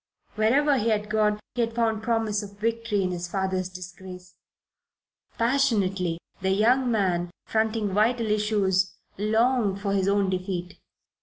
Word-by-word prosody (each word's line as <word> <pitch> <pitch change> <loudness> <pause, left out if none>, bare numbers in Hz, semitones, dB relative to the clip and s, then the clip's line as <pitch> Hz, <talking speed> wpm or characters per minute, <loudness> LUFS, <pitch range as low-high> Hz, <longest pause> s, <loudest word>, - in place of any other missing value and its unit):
Wherever 270 +6 +3
he 230 +1 0
had 210 -1 -1
gone 210 -1 +2
he 245 - -1
had 230 0 -1
found 225 -2 +1
promise 225 -2 0
of 200 -1 -10
victory 230 -1 -1
in 185 - -1
his 175 0 -4
father's 190 0 -2
disgrace. 180 0 -10 1.0
Passionately 200 -9 +1 0.2
the 190 - 0
young 240 +6 +3
man, 185 -6 +1 0.2
fronting 220 -1 0
vital 225 +2 +2
issues, 205 -3 +1 0.2
longed 220 -1 +2
for 200 -1 -1
his 195 -1 +1
own 200 -1 +2
defeat. 180 -1 -4
210 Hz, 140 wpm, -26 LUFS, 190-225 Hz, 1.0 s, Wherever